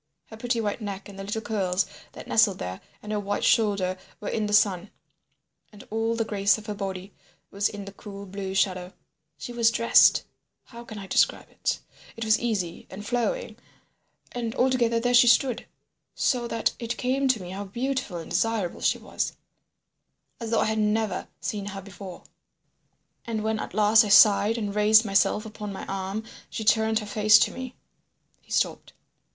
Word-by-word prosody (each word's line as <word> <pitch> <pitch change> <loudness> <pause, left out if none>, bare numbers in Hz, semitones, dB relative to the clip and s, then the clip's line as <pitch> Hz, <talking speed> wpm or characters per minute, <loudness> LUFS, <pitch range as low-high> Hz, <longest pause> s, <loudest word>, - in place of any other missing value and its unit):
Her 220 - -9
pretty 240 +1 -1
white 210 +1 -2
neck 200 -2 -6
and 195 -1 -11
the - - -5
little 215 +3 -4
curls 190 -4 0 0.3
that - - -10
nestled - - +3
there, 90 +1 -6 0.2
and 210 - -6
her 210 - 0
white 205 0 -2
shoulder 200 -4 +2 0.2
were 210 - -5
in 215 -1 -1
the - - -4
sun, 205 -2 +3 0.8
and 210 - -13
all 225 +1 0
the 225 -1 -1
grace 200 -1 +2
of 215 - -11
her 210 - -4
body 195 -1 -6 0.4
was 200 +1 0
in 205 -1 -8
the 200 - -8
cool 200 0 -10
blue 190 0 -5
shadow. 185 -1 0 0.4
She 245 - -7
was 235 -1 +4
dressed—how 235 +1 +2
can 220 -2 -9
I 200 - -7
describe - - +1
it? - - -2 0.4
It 230 - -3
was 220 0 +4
easy 200 -8 -3
and 205 +2 -9
flowing. 245 - -2 0.7
And 235 -2 -4
altogether 245 -3 +2
there 245 +1 0
she 245 0 +7
stood, 240 +1 +3 0.5
so 245 -3 +1
that 230 -1 0
it 235 -1 -4
came 265 +2 0
to 255 -4 +2
me 180 -1 -8
how 200 +2 -5
beautiful 240 -2 -3
and 165 - -8
desirable 225 -6 -1
she - - +2
was, - - -3 1.1
as 230 -2 -5
though 230 - +2
I - - +2
had 220 0 0
never 215 0 0
seen 205 -2 -3
her 195 -1 -6
before. 190 -2 -10 1.0
And 225 -2 -3
when 220 0 -1
at - - -6
last 215 +2 +6
I 210 - -3
sighed 210 +1 +6
and 205 -3 -3
raised 215 +2 +5
myself 200 +2 +2
upon 210 -1 -7
my 195 - -7
arm 195 +2 -4 0.3
she 220 - -5
turned 220 +1 +3
her 215 - -2
face 215 +1 +5
to - - +2
me—" 260 -1 -7 0.7
He - - -21
stopped. - - -1
210 Hz, 180 wpm, -26 LUFS, 200-230 Hz, 1.1 s, she